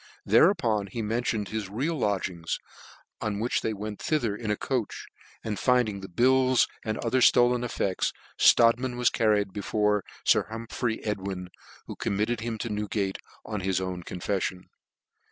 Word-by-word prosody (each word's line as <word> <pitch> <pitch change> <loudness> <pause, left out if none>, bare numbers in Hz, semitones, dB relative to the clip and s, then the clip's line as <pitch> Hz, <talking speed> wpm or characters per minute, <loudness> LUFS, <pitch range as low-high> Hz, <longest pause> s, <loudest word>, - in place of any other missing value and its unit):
Hereupon 110 - +3
he 115 +4 -4
mentioned 110 -1 -1
his 110 -3 -4
real 140 +11 -1
lodgings; 95 - -1 0.6
on 105 -1 -2
which 120 +3 0
they 110 - -1
went 105 0 -6
thither 120 -10 0
in 110 0 -5
a 105 - +1
coach, 125 -5 -3 0.4
and 105 -2 -3
finding 125 -6 +2
the 95 - -9
bills 130 +5 +4 0.2
and 110 -1 -2
other 130 +3 +2
(iolcip 125 0 +5
effects 100 -5 -1 0.2
Strodtman 120 +2 +4
was 125 -1 +3
carried 105 -4 +2
before 105 0 +1 0.2
Sir - - +4
Hum 115 +1 -5
r - - -7
phry 120 -3 -1
Edwin, 95 -3 -3 0.3
who - - -7
committed 105 +4 -1
him 115 0 -3
to 115 - -4
Newgate, 105 -2 -2 0.3
on 105 -2 -3
his 95 -1 0
own 95 -1 -4
confeffion. 90 +1 -3
110 Hz, 155 wpm, -27 LUFS, 100-120 Hz, 0.6 s, iolcip